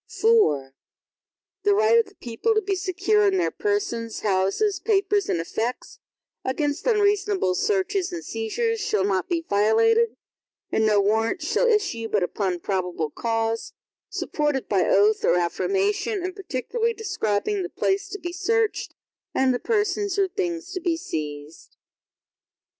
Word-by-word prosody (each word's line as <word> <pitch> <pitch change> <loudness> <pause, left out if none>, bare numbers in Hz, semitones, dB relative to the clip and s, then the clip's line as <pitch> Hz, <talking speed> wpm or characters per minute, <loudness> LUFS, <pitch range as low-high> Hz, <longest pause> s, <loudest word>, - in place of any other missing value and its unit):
IV 285 - +2 0.9
The 405 +1 +3
right 435 +3 +5
of 455 - +1
the 400 - -19
people 245 - -1
to 435 - +3
be 395 +1 -1
secure 390 +3 +1
in 385 -1 +2
their 360 - +1
persons, 410 - -2
houses, 205 - +1
papers, 405 -2 +1
and - - +1
effects, 225 +9 -4 0.4
against 290 - -2
unreasonable 410 - +2
searches 385 - 0
and 345 -1 -6
seizures, 450 - -2
shall 210 - +1
not 190 -2 0
be 335 -2 -1
violated, 225 +3 +3 0.5
and 220 0 +2
no 210 -1 +4
Warrants 225 - +1
shall 485 - +2
issue, 395 - +1
but 205 -4 +1
upon 180 -1 -2
probable 180 -5 -2
cause, 225 +2 -2 0.4
supported 295 -3 -1
by 195 -3 +2
oath 210 +2 +4
or 170 - +4
affirmation, 395 - 0
and 370 +1 -4
particularly 430 - -2
describing 390 - -1
the 360 - -4
place 395 +1 -1
to 405 - -5
be 350 -2 -6
searched, 440 +4 0 0.4
and 265 -1 +3
the 245 - -1
persons 415 -3 0
or 395 -1 +3
things 350 -2 -3
to 370 - -3
be 340 -2 0
seized. 150 - -7
345 Hz, 145 wpm, -24 LUFS, -, 0.9 s, right